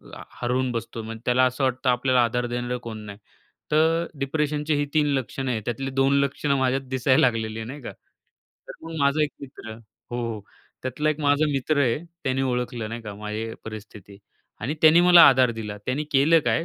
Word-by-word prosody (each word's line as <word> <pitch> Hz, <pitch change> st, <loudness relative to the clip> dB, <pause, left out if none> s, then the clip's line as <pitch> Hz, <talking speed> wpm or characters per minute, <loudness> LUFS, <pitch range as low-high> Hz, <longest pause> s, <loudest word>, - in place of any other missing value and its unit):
आ, -, -, -9 dB, 0.2 s
हरवून 125 Hz, +1 st, 0 dB
बसतो 115 Hz, -1 st, -5 dB
म्हणजे 115 Hz, 0 st, -8 dB
त्याला 125 Hz, +1 st, +3 dB
असं 130 Hz, +2 st, -1 dB
वाटतं 130 Hz, 0 st, 0 dB
आपल्याला 125 Hz, 0 st, +3 dB
आधार 120 Hz, +1 st, 0 dB
देणारं 120 Hz, +1 st, -3 dB
कोण 115 Hz, -2 st, -6 dB
नाही. 100 Hz, -1 st, -9 dB, 0.5 s
तर 160 Hz, +2 st, +3 dB
डिप्रेशनचे 150 Hz, +2 st, -1 dB
ही 145 Hz, -, 0 dB
3 155 Hz, -1 st, +3 dB
लक्षणं 135 Hz, 0 st, -2 dB
आहेत 110 Hz, -3 st, -2 dB
त्यातली 135 Hz, +3 st, -3 dB
2 135 Hz, +1 st, +2 dB
लक्षणं 140 Hz, 0 st, 0 dB
माझ्यात 130 Hz, +1 st, +1 dB
दिसायला 130 Hz, 0 st, +2 dB
लागलेली 110 Hz, -1 st, -3 dB
आहे 110 Hz, -, -5 dB
नाही 140 Hz, +4 st, -8 dB
का. 120 Hz, -, -7 dB, 0.8 s
तर -, -, -6 dB
मग 165 Hz, -, -7 dB
माझा 140 Hz, +2 st, +3 dB
1 150 Hz, -, 0 dB
मित्र 130 Hz, -5 st, -9 dB, 0.4 s
हो 115 Hz, -3 st, -3 dB, 0.4 s
त्यातला 150 Hz, +4 st, -1 dB
1 155 Hz, 0 st, -4 dB
माझा 145 Hz, +1 st, +3 dB
मित्र 145 Hz, +2 st, 0 dB
आहे. 125 Hz, -1 st, +2 dB, 0.3 s
त्याने 135 Hz, 0 st, 0 dB
ओळखलं 125 Hz, -3 st, -2 dB
नाही 115 Hz, +1 st, -6 dB
का, 105 Hz, -2 st, -7 dB
माझी 105 Hz, +2 st, -5 dB, 0.2 s
परिस्थिती 105 Hz, -2 st, -10 dB, 0.4 s
आणि 130 Hz, +8 st, -2 dB
त्याने 160 Hz, +2 st, +7 dB
मला 175 Hz, -1 st, +8 dB
आधार 130 Hz, -2 st, +4 dB
दिला 105 Hz, -2 st, -6 dB
त्यांनी 135 Hz, +4 st, -1 dB
केलं 150 Hz, +4 st, +5 dB
काय, 165 Hz, -, +1 dB
130 Hz, 190 wpm, -24 LUFS, 115-145 Hz, 0.8 s, मला